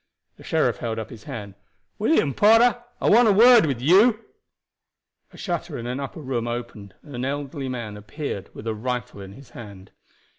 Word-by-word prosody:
The - - -15
sheriff - - 0
held 115 -1 -4
up 110 +2 -6
his 110 -3 -12
hand. 100 -3 -7 0.5
"William 210 - +2
Porter, 230 - +4 0.2
I - - -1
want 235 +2 +6
a - - +5
word 230 -1 +6
with 135 -5 -2
you." 200 - +4 1.1
A - - -16
shutter 170 -4 -4
in 115 - -7
an 125 +2 -4
upper 140 +3 -7
room 125 -4 -3
opened, 120 -5 -7
and 145 - -13
an 125 0 -4
elderly 140 0 -4
man 115 -5 -5
appeared 105 - -6
with 105 - -10
a 110 - -2
rifle 120 -2 -5
in 95 0 -10
his 135 +4 -15
hand. 100 -4 -12
130 Hz, 185 wpm, -23 LUFS, 110-175 Hz, 1.1 s, want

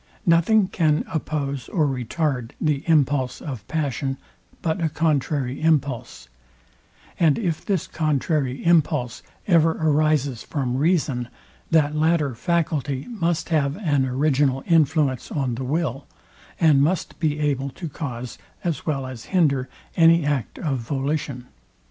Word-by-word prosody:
Nothing 185 +5 +4
can 155 -5 +1
oppose 140 -4 -3
or 160 -5 +1
retard 130 -1 -2
the 150 -3 0
impulse 145 -5 +2
of 125 -9 -7
passion, 140 -3 -2 0.5
but 165 +2 -1
a 165 - +1
contrary 145 -4 0
impulse; 140 - 0 0.9
and 160 -4 +4
if 175 -8 -2
this 195 -5 -1
contrary 150 -3 -1
impulse 150 -7 +2 0.2
ever 165 -3 +4
arises 150 -5 +1
from 130 -4 -2
reason, 140 -5 +1 0.4
that 155 -2 +3
latter 155 -3 +2
faculty 145 -2 -1
must 175 -8 -1
have 145 -2 +1
an 145 -9 +1
original 135 0 +1
influence 155 -5 +2
on 135 -4 -1
the 125 +3 -4
will, 140 -1 -2 0.5
and 150 -4 +5
must 165 +4 0
be 150 -2 0
able 140 -2 0
to 170 +5 -7
cause, 125 -6 -6 0.2
as 170 -2 -3
well 135 -4 -1
as 130 -3 -8
hinder 140 -8 +1 0.3
any 165 -1 +5
act 140 -6 -1
of 140 -6 -2
volition. 135 0 -3
150 Hz, 130 wpm, -23 LUFS, 135-160 Hz, 0.9 s, and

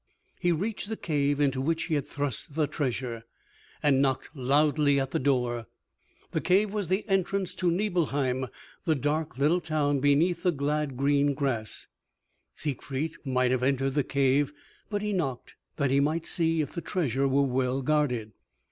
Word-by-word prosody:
He 175 - +2
reached 200 +5 -2
the 220 - -3
cave 145 -2 0
into 135 -2 +2
which 165 +4 0
he 165 - -3
had 145 -3 0
thrust 145 0 -4
the 155 -2 +2
treasure, 125 -5 -3 0.6
and 140 -2 +4
knocked 135 +3 -1
loudly 145 +2 +3
at 135 -1 -2
the - - 0
door. 125 -4 0 0.6
The - - -1
cave 200 +3 +2
was 205 -4 -1
the 190 +6 0
entrance 195 -1 0
to 180 -1 0
Nibelheim 145 -9 0 0.4
the 160 - +3
dark, 150 0 -1
little 155 +6 +3
town 150 -3 +1
beneath 155 +5 +3
the 180 - +3
glad, 145 -2 -1
green 140 +1 +2
grass. 130 -7 -2 0.7
Siegfried 145 +1 -3
might 130 -1 +2
have 130 -1 +1
entered 135 0 +1
the 145 0 +2
cave, 140 +1 +2 0.4
but 205 -1 -2
he 210 0 -1
knocked 135 -10 -2 0.2
that 140 -3 0
he 135 - +4
might 155 +3 +1
see 165 -2 +1
if 145 - -3
the 170 - -4
treasure 140 -6 0
were 140 +1 +3
well 130 0 0
guarded. 125 -7 +1
145 Hz, 165 wpm, -28 LUFS, 135-165 Hz, 0.7 s, and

